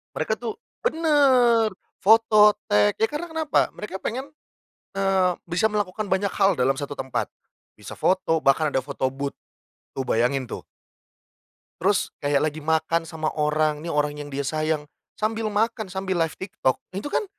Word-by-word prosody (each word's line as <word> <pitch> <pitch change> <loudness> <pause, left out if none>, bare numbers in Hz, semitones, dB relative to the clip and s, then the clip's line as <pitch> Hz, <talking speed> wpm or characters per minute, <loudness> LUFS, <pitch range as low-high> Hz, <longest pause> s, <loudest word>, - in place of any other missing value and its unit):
Mereka - - 0
tuh 440 0 -6 0.2
bener 265 - +4 0.3
foto, 215 0 +6 0.2
tag, 105 0 +4
ya 225 - +3
karena 320 +4 -5
kenapa, 315 -2 +1
mereka 210 -2 -8
pengen 260 +5 -3 0.7
eee, 190 -2 +2 0.2
bisa 175 +6 +1
melakukan 205 0 -2
banyak 190 +1 +1
hal 195 -3 +3
dalam 135 +2 +3
1 145 +1 -5
tempat, 130 -1 -2 0.5
bisa - - -9
foto, 180 -4 +1
bahkan 145 +3 +3
ada 130 - +2
foto 140 -2 -2
booth, 140 +1 -5 0.6
tuh 135 - -3
bayangin 125 +3 +1
tuh. - - -6 1.2
Terus 195 +2 +1
kayak 145 +1 +2
lagi 155 0 -3
makan 160 +2 0
sama 155 -2 -3
orang, 150 0 +1
nih 170 - -5
orang 150 -2 0
yang 145 0 -8
dia 140 0 -3
sayang 155 0 -1 0.3
sambil 220 0 -1
makan, 220 0 -1
sambil 190 0 -2
live 165 - -1
TikTok. 165 -9 -1 0.2
Nah, - - -5
itu 290 - -5
kan 425 - 0
180 Hz, 160 wpm, -24 LUFS, 150-215 Hz, 1.2 s, foto